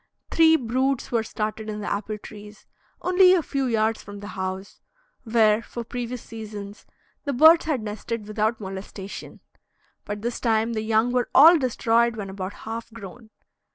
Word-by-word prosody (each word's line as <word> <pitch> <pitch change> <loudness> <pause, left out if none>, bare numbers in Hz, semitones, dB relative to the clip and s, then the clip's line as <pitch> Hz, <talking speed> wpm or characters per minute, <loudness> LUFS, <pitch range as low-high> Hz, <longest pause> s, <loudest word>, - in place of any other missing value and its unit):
Three 320 -1 +6
broods 260 0 -1
were 230 -2 +2
started 215 0 -4
in 210 0 -4
the 210 - -5
apple 210 +1 -4
trees, 210 0 -12 0.4
only 365 0 +6
a 345 - +1
few 275 -2 -2
yards 225 -2 0
from 205 0 -10
the 205 +1 -8
house, 190 0 -6 0.4
where, 220 -1 +3
for 235 +1 -7
previous 245 +1 -5
seasons, 210 -2 -9 0.4
the 285 - -1
birds 320 +6 +6
had 285 -8 -1
nested 215 +1 -5
without 215 +1 -1
molestation; 195 0 -8 0.6
but 205 0 -6
this 240 0 -3
time 225 0 +1
the 215 - -2
young 220 +2 +1
were 250 -1 0
all 320 +6 +9
destroyed 235 -2 +1
when 200 -3 -6
about 190 0 -5
half 225 +1 -6
grown. 220 +1 -11
225 Hz, 160 wpm, -24 LUFS, 210-245 Hz, 0.6 s, all